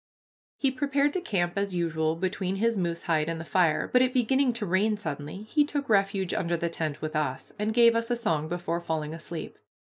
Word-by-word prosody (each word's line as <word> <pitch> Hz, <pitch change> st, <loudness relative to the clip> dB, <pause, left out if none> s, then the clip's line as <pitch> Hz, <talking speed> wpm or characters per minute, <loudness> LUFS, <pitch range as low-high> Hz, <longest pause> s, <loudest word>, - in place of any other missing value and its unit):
He 270 Hz, -2 st, +1 dB
prepared 280 Hz, +2 st, +1 dB
to 370 Hz, -, -1 dB
camp 175 Hz, -, 0 dB
as 200 Hz, -2 st, -1 dB
usual 160 Hz, -2 st, 0 dB
between 185 Hz, +2 st, -2 dB
his 230 Hz, +3 st, +1 dB
moose 170 Hz, -3 st, -2 dB
hide 160 Hz, -2 st, +1 dB
and 165 Hz, -1 st, -3 dB
the 165 Hz, -, -6 dB
fire, 170 Hz, -2 st, +2 dB
but 250 Hz, -, +4 dB
it 255 Hz, 0 st, +2 dB
beginning 260 Hz, +2 st, +3 dB
to 230 Hz, -2 st, -3 dB
rain 205 Hz, +4 st, +2 dB
suddenly 155 Hz, +1 st, -5 dB
he 295 Hz, +8 st, +2 dB
took 285 Hz, -1 st, -2 dB
refuge 195 Hz, -2 st, +2 dB
under 170 Hz, -1 st, 0 dB
the 170 Hz, +1 st, -1 dB
tent 155 Hz, -3 st, -3 dB
with 155 Hz, 0 st, -3 dB
us, 140 Hz, -4 st, -2 dB
and 210 Hz, +1 st, 0 dB
gave 235 Hz, 0 st, +5 dB
us 230 Hz, +1 st, 0 dB
a 240 Hz, -, +2 dB
song 165 Hz, -10 st, -1 dB
before 170 Hz, 0 st, -2 dB
falling 160 Hz, -2 st, -3 dB
asleep. 165 Hz, 0 st, -7 dB
190 Hz, 210 wpm, -27 LUFS, 165-230 Hz, -, gave